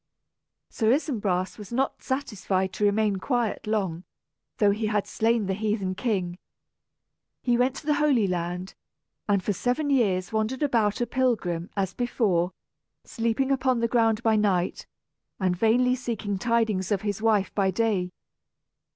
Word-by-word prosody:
Sir 220 0 +2
Isumbras 210 - 0
was 210 0 -10
not 265 +3 -1
satisfied 195 -8 -2
to 210 - -3
remain 205 0 +2
quiet 235 0 -1
long, 190 -6 -1 0.5
though 205 -4 +4
he 215 +2 -1
had 210 -1 0
slain 225 -1 +1
the 190 - -1
heathen 210 -2 -1
king. 185 -4 -2 1.0
He 245 -1 +2
went 250 +2 +2
to 295 - -9
the 300 - +3
Holy 290 -7 +3
Land, 180 0 -3 0.6
and 200 -2 +2
for 205 - 0
seven 250 - -1
years 190 -9 +1
wandered 220 +6 -1
about 230 -6 +1
a - - +2
pilgrim, 210 -10 0
as 190 -1 0
before, 190 -6 0 0.5
sleeping 235 +4 -1
upon 260 -2 +2
the 230 - +1
ground 225 -1 +2
by 225 -1 +3
night, 195 -4 0 0.5
and 185 -2 +1
vainly 235 +6 +3
seeking 225 -6 -3
tidings 220 -4 0
of 200 0 0
his 205 0 -2
wife 215 -3 +2
by 195 -2 +2
day. 190 -2 0
215 Hz, 150 wpm, -26 LUFS, 190-240 Hz, 1.0 s, though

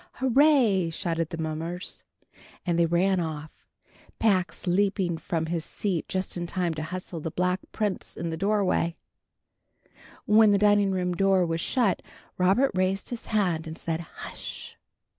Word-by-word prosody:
"Hurray!" 260 - +4
shouted 165 -1 -2
the 165 - -5
mummers, 165 +3 -3 0.6
and 170 -2 +1
they 170 - +4
ran 185 +3 +2
off, 155 -2 -4 0.7
Pax 190 -5 +1
leaping 185 -2 +1
from 160 0 -2
his 165 0 -2
seat 185 -3 -2
just 185 0 -2
in 175 -1 -3
time 175 -2 -1
to 155 - -5
hustle 180 +1 -5
the 160 - -4
Black 180 +3 0
Prince 210 -4 -3
in 170 +1 -3
the - - -2
doorway. 190 -2 +1 1.3
When 215 0 +6
the 200 - +5
dining 205 -1 +4
room 180 -1 0
door 190 0 +3
was 165 0 -2
shut, 230 -4 +1 0.4
Robert 195 +10 +4
raised 185 +1 0
his 240 -2 -6
hand, 180 -7 0
and 160 +1 -7
said 165 -1 -2
"Hush!" 170 - -8
180 Hz, 150 wpm, -27 LUFS, 165-200 Hz, 1.3 s, When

